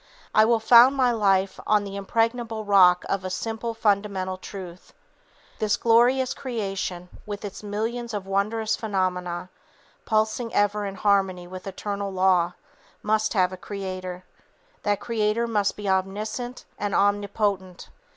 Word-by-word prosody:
I 215 - +6
will 230 0 +3
found 240 +4 +7
my 255 -2 +3
life 195 -4 +1
on 210 -1 +3
the 200 -1 -7
impregnable 225 +2 -1
rock 185 -3 +5
of 195 -1 -1
a 185 - -3
simple 225 +4 -4
fundamental 200 -3 0
truth: 185 -2 -10 0.7
'This 210 -1 +1
glorious 245 +3 +3
creation 195 -7 -4 0.2
with 205 0 -5
its 200 - -7
millions 225 +3 -3
of 205 -3 -4
wondrous 210 +3 0
phenomena 185 -4 -2 0.6
pulsing 220 +2 0
ever 205 0 +1
in 195 - -6
harmony 190 -3 +1
with 185 +2 -9
eternal 200 +1 -4
law 185 -2 +2 0.5
must 215 0 +1
have 185 -1 +2
a - - -7
Creator, 185 -2 -6 0.6
that 205 -1 0
Creator 225 0 0
must 210 -3 0
be 205 -1 -5
omniscient 210 +6 -2
and 205 -2 -1
omnipotent. 200 -2 0
205 Hz, 135 wpm, -25 LUFS, 190-220 Hz, 0.7 s, found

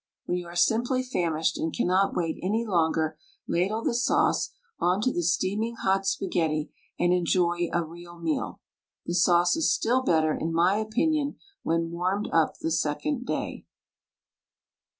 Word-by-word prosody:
When 175 - -1
you 175 -1 -4
are 170 - -10
simply 235 +8 +2
famished 165 -9 -1
and 160 - -1
cannot 185 +4 +1
wait 165 -2 -1
any 220 +5 0
longer, 160 -5 +1 0.3
ladle 200 +6 0
the - - +1
sauce 240 - +2 0.3
onto 200 +8 +2
the 175 - 0
steaming 195 +7 0
hot 195 -2 0
spaghetti 160 -5 -1 0.3
and 175 0 +2
enjoy 175 -1 +1
a 170 - +1
real 170 +1 -11
meal. 165 -2 -3 0.4
The 175 - -3
sauce 175 - +4
is 325 -1 +2
still 250 +3 +2
better, 160 -9 +2
in 165 +2 -2
my 175 +5 +3
opinion, 285 +7 0 0.3
when 165 0 0
warmed 185 +4 -1
up 165 -2 +3
the 165 - -3
second 170 - -1
day. - - -4
175 Hz, 150 wpm, -27 LUFS, 165-215 Hz, 0.4 s, sauce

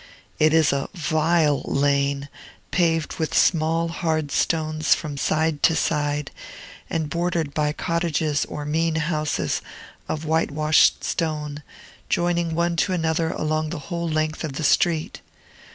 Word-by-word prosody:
It 155 0 +5
is 160 -2 +4
a 140 0 -2
vile 155 -2 +2
lane, 140 0 0 0.4
paved 165 -3 +1
with 160 -2 0
small, 165 0 +2
hard 160 -3 -1
stones 155 0 +1
from 150 -3 -6
side 155 +1 0
to 165 - +4
side, 145 -2 -1 0.6
and 160 -2 -1
bordered 170 -2 -1
by 150 -1 +1
cottages 160 -2 0
or 150 - -6
mean 160 +2 0
houses 155 -1 -1 0.5
of 155 0 -3
whitewashed 155 -1 +3
stone, 150 -3 -2 0.5
joining 170 -1 0
one 170 0 0
to 185 - +1
another 160 -1 0
along 155 0 -1
the 175 - -4
whole 170 -1 -2
length 155 0 -1
of 155 -4 -4
the 155 - -4
street. 160 +1 +1
155 Hz, 135 wpm, -23 LUFS, 150-165 Hz, 0.6 s, It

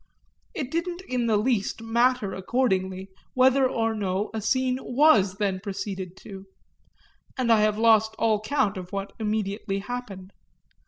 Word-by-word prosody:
It 275 -2 -4
didn't 345 +2 -2
in 245 -2 -1
the 220 -2 +3
least 220 -2 0
matter 235 -2 +1
accordingly 190 -3 -1 0.3
whether 260 +1 +4
or 225 -2 0
no 200 -1 -2
a 220 - -3
scene 255 +3 +1
was 245 -8 +3
then 195 -2 -1
proceeded 190 -2 -5
to 195 -1 -10 0.9
and 250 -3 +1
I 220 -2 +5
have 210 0 +2
lost 220 -1 +4
all 220 -2 +2
count 215 -4 0
of 180 -1 -8
what 200 0 -4
immediately 210 -2 -2
happened. 200 -3 -7
215 Hz, 145 wpm, -25 LUFS, 195-250 Hz, 0.9 s, I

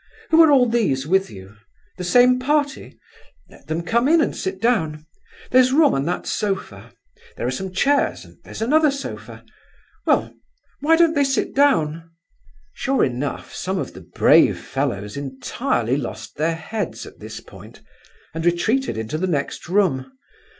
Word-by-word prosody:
Who 325 +1 +7
are 320 - +7
all 265 -4 +5
these 200 - 0
with 190 +4 +1
you? 95 +1 -13 0.4
The 180 - -5
same 250 +7 +4
party? 285 +1 -1 0.5
Let - - -18
them 160 +2 -2
come 235 +7 +1
in 330 +3 +5
and 310 - 0
sit 190 0 -4
down. 160 -10 0 0.5
There's 255 0 +5
room 295 +1 +4
on 135 - -1
that 175 +2 -2
sofa, 200 -3 -3 0.5
there - - -3
are 125 - 0
some 190 +8 -5
chairs 280 +10 +1
and - - -19
there's - - -6
another 305 +5 +4
sofa! 275 0 -7 0.6
Well, - - +2 0.5
why 320 +3 +4
don't 330 -1 +4
they 285 -2 +2
sit 270 -1 -1
down?" 165 - +2 0.6
Sure 270 0 0
enough, 130 +2 -4
some 190 +1 -3
of - - -4
the - - -11
brave - - +4
fellows 105 +4 -3
entirely 135 - -2
lost 140 - -6
their 160 +2 0
heads 195 +4 -5
at - - -14
this - - -8
point, - - -15 0.5
and 165 0 -4
retreated 195 - 0
into 110 +8 -4
the 185 - -1
next 150 -1 -3
room. 155 -10 +1
190 Hz, 160 wpm, -21 LUFS, -, 0.6 s, Who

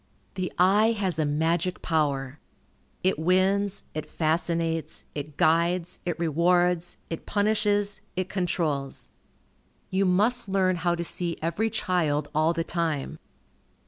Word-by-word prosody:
The 185 -2 -3
eye 205 +5 +4
has 190 -7 -2
a 155 - +2
magic 165 +4 0
power. 145 -4 0 0.6
It 185 -4 +2
wins, 190 +4 +2
it 155 - -5
fascinates, 165 -1 -1
it 145 0 -6
guides, 170 +2 +2
it 175 -3 -2
rewards, 175 +2 +1
it 165 - -5
punishes, 205 -1 +1
it 185 0 -1
controls. 160 -8 -2 0.8
You 195 +1 +2
must 210 +5 +3
learn 185 -2 +2
how 175 +1 +1
to 170 - -3
see 170 0 -2
every 170 +8 0
child 155 -8 0
all 155 +1 +3
the 165 0 -1
time. 165 -5 -2
175 Hz, 125 wpm, -26 LUFS, 160-185 Hz, 0.8 s, eye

